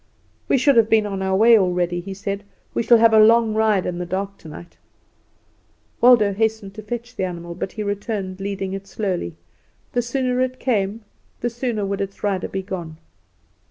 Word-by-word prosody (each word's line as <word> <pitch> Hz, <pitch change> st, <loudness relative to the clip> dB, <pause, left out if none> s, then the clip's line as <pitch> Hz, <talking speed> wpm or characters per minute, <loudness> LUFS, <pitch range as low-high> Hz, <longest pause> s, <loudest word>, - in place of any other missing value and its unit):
"We -, -, +3 dB
should 265 Hz, 0 st, +3 dB
have 225 Hz, -1 st, +5 dB
been 220 Hz, -1 st, +4 dB
on 195 Hz, -2 st, -4 dB
our 190 Hz, 0 st, 0 dB
way 225 Hz, +2 st, +6 dB
already," 180 Hz, -2 st, 0 dB
he 190 Hz, +2 st, -7 dB
said. 200 Hz, +1 st, -4 dB, 0.3 s
"We -, -, 0 dB
shall 235 Hz, +1 st, +5 dB
have 225 Hz, 0 st, +5 dB
a 220 Hz, -, +7 dB
long 225 Hz, 0 st, +5 dB
ride 215 Hz, -3 st, +2 dB
in 175 Hz, 0 st, -3 dB
the 180 Hz, -, -3 dB
dark 195 Hz, +2 st, -3 dB
tonight." 165 Hz, +2 st, -12 dB, 1.2 s
Waldo 235 Hz, -5 st, +6 dB
hastened 220 Hz, -1 st, -1 dB
to 215 Hz, -, -8 dB
fetch 240 Hz, +3 st, -6 dB
the 190 Hz, -, -2 dB
animal; 170 Hz, -2 st, -5 dB
but 185 Hz, +2 st, -5 dB
he 215 Hz, -, -4 dB
returned 205 Hz, -2 st, -4 dB
leading 195 Hz, -1 st, -4 dB
it 195 Hz, 0 st, -6 dB
slowly. 185 Hz, -6 st, -3 dB, 0.6 s
The 245 Hz, -, +2 dB
sooner 250 Hz, +1 st, -1 dB
it 255 Hz, 0 st, -2 dB
came 210 Hz, -3 st, -1 dB, 0.4 s
the 240 Hz, -, -1 dB
sooner 235 Hz, -3 st, -2 dB
would 195 Hz, 0 st, -2 dB
its 195 Hz, 0 st, -6 dB
rider 195 Hz, -3 st, 0 dB
be 190 Hz, 0 st, -4 dB
gone. 175 Hz, -5 st, -6 dB
205 Hz, 190 wpm, -21 LUFS, 190-230 Hz, 1.2 s, a